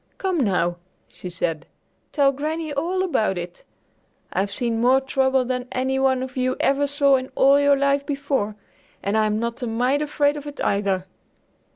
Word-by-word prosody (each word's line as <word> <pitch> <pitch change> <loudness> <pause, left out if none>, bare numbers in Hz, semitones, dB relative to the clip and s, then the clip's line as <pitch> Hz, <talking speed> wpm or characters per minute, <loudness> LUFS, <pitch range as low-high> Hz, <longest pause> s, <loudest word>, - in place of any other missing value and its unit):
"Come, 375 -3 -1
now," 175 -4 0 0.3
she 180 - -9
said, 170 -3 -3 0.4
"tell 280 -2 +3
Granny 310 +2 -3
all 350 +6 -1
about 220 - 0
it! 175 0 -7 0.7
I've 195 +1 0
seen 230 +2 -1
more 255 +2 +5
trouble 265 -1 +1
than 250 0 -3
any 260 +1 -1
one 260 -1 +1
you 255 0 -1
ever 280 +1 +2
saw 280 -1 +3
in 260 0 -6
all 275 +1 +5
your 285 0 +4
life 280 0 +2
before, 275 -7 -1 0.5
and 200 +2 -1
I'm 215 -1 +2
not 235 +2 -3
a 245 - -2
mite 250 +5 +1
afraid 295 -1 +1
of 295 0 -8
it 290 - -9
either." 200 -2 0
265 Hz, 170 wpm, -23 LUFS, 220-285 Hz, 0.7 s, more